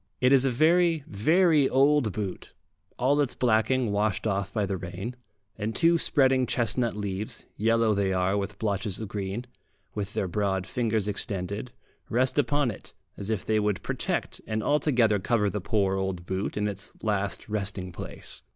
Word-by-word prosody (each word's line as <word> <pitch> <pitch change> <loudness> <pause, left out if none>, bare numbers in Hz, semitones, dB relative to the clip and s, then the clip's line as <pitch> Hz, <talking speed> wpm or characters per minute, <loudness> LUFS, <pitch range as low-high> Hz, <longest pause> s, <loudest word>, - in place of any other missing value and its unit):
It 125 +1 +4
is 135 -1 +5
a - - +3
very, 165 +4 +3
very 155 - +3
old 140 -3 +3
boot, 100 -1 -5 0.4
all 140 +4 +3
its 140 - -1
blacking 120 0 +2
washed 105 +1 0
off 100 -2 -1
by 105 -3 0
the 95 0 -2
rain, 95 +6 -6 0.4
and 110 +1 -2
two 170 0 +4
spreading 130 -4 +3
chestnut 120 -1 0
leaves, 100 0 -4
yellow 115 0 +2
they 100 -1 +1
are 95 +1 +1
with 100 0 -3
blotches 100 -2 -1
of 110 - -4
green, 100 +3 -4 0.5
with 100 -2 -4
their 95 - 0
broad 95 0 -1
fingers 110 -2 -1
extended, 100 +3 -3 0.4
rest 130 +4 +2
upon 145 -3 +2
it, 105 - -12 0.2
as 100 - -6
if 110 -3 -1
they 110 -1 +2
would 105 -2 -1
protect - - -2
and 110 0 -2
altogether 125 -8 +3
cover 105 0 +1
the 105 - -3
poor 95 -1 +1
old 95 -2 -3
boot 95 +3 -3
in 105 0 +1
its 100 -1 -6
last 100 -2 -1
resting 100 -3 -3
place. 85 - -4
105 Hz, 170 wpm, -27 LUFS, 100-125 Hz, 0.5 s, is